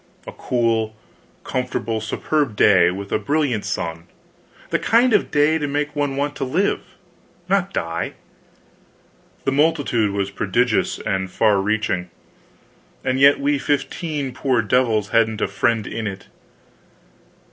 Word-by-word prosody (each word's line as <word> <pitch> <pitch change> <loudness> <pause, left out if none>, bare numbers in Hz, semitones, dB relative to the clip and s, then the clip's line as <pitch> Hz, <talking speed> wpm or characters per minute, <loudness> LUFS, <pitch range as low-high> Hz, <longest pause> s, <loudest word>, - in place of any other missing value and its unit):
A - - -7
cool, 115 -3 -1 0.5
comfortable, 110 0 -2
superb 130 +3 -1
day, 90 -4 +5
with 100 +2 -6
a - - +1
brilliant 140 -7 0
sun; 85 -5 -4 0.6
the - - +2
kind 240 +2 +3
of 210 - +2
day 150 +2 +3
to 145 - -2
make 145 +1 -2
one 145 -2 -1
want 145 +1 -2
to - - -2
live, 165 +10 0 0.7
not 195 0 +1
die. 85 - -3 1.3
The 135 - 0
multitude 145 -7 +2
was 100 0 -2
prodigious 110 +4 0
and 95 -3 -2
far 100 +1 +2
reaching; 95 -4 -1 0.9
and 130 0 0
yet 140 +1 +6
we 140 0 +1
fifteen 145 0 -2
poor 130 -3 +1
devils 110 -2 +1
hadn't 110 -1 +2
a - - +1
friend 110 +2 0
in 110 +2 -4
it. 95 -1 -7
120 Hz, 135 wpm, -21 LUFS, 105-145 Hz, 1.3 s, yet